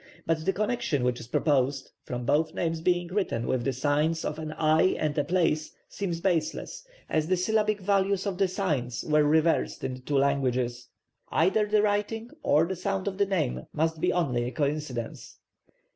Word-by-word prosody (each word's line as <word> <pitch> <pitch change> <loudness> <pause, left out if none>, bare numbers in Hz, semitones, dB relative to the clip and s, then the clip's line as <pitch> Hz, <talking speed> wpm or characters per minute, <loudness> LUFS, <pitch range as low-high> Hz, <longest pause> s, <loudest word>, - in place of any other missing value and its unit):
But 160 -1 0
the - - +5
connection 215 - -1
which 125 -1 0
is 115 - -9
proposed, 135 +1 +1
from 125 0 -4
both 155 +4 +1
names 165 -1 -1
being 175 0 +1
written 180 - -1
with 130 -2 0
the 135 - +1
signs 150 +5 0
of - - -3
an 155 -1 -5
eye 155 +3 +3
and 150 -2 -1
a 145 - +1
place, 165 -3 0
seems 175 -4 -3
baseless, 175 - -1 0.2
as 155 0 0
the 185 +1 +2
syllabic 215 +3 +1
values 195 0 +1
of 195 -2 -3
the 195 - +4
signs 145 - -2
were 150 -1 +3
reversed 160 +2 +2
in 130 - -2
the 125 - -8
two 140 +2 -1
languages; 130 -3 0 0.4
either 195 +6 +2
the 210 0 +3
writing 210 +3 -1
or 150 +3 +3
the 190 +2 -3
sound 195 +2 -2
of 195 0 -3
the 200 - +3
name 165 -10 -1
must 160 0 0
be - - +2
only 130 -9 0
a 125 - -3
coincidence. 140 -4 -3
160 Hz, 185 wpm, -27 LUFS, 140-190 Hz, 0.4 s, the